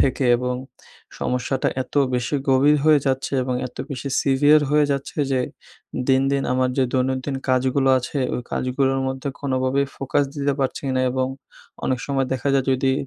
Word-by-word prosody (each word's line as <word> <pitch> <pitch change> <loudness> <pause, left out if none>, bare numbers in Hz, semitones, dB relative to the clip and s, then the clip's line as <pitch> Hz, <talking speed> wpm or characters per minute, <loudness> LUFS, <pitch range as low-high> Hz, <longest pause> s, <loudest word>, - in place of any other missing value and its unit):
থেকে। 130 0 +1
এবং 125 +1 -2 0.6
সমস্যাটা 125 +1 -1
এত - - -17 0.2
বেশি 125 +3 -1
গভীর 140 +3 +5
হয়ে 155 -1 +6
যাচ্ছে 135 +1 -1
এবং 125 0 -2
এত 125 - -15
বেশি 140 +1 -4
সিভিয়ার 145 +2 +4
হয়ে 150 0 +4
যাচ্ছে 140 +2 -5
যে 130 - +2 0.7
দিন, 135 0 +4
দিন 140 -1 +1
আমার 130 0 +2
যে 135 - +3
দৈনন্দিন 130 +1 -1
কাজগুলো 130 +1 +2
আছে, 130 +3 -4 0.2
ওই 125 - -3
কাজগুলোর 135 +1 0
মধ্যে 130 +1 -4
কোনোভাবেই 135 0 0
ফোকাস 135 +1 0
দিতে 140 -1 0
পারছি 135 +1 -2
না। 130 - +2
এবং 130 0 0 0.6
অনেক 130 - 0
সময় 135 -2 0
দেখা 130 +1 -1
যায় 135 -1 +2
যদি 130 0 +2
130 Hz, 165 wpm, -22 LUFS, 130-140 Hz, 0.7 s, হয়ে